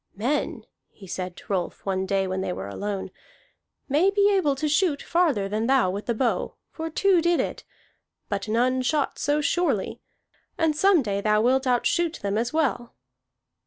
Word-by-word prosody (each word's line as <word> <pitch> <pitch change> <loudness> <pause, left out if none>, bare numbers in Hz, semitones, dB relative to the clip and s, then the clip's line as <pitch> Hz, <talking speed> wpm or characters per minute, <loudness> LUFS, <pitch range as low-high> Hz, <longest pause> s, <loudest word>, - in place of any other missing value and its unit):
"Men," 255 +9 -2 0.4
said 185 0 -4
he - - -40
to 205 - -6
Rolf 180 -2 -3
one 190 -1 -1
day 195 0 +1
when 190 0 -2
they - - -2
were 95 +2 -5
alone, 195 - -4 0.8
"may 305 +8 +3
be 405 0 +3
able 295 -8 +2
to 305 +3 -2
shoot 300 -1 +1
farther 310 - +1
than 215 +3 -1
thou 260 -8 +3
with 200 +2 -6
the 235 - 0
bow, 240 +1 -1 0.2
for 325 0 -5
two 370 +2 +3
did 345 +1 +2
it. - - -3 0.6
But 200 0 -3
none 250 +4 +1
shot 285 +2 0
so 295 +1 +1
surely. 350 +4 0 0.6
And 320 -2 +1
some 365 -1 +4
day 200 -2 -2
thou 210 0 +2
wilt 265 +2 +2
outshoot 310 +7 +1
them 200 0 -1
as 235 +1 -1
well." 285 -6 -1
255 Hz, 175 wpm, -25 LUFS, 200-315 Hz, 0.8 s, some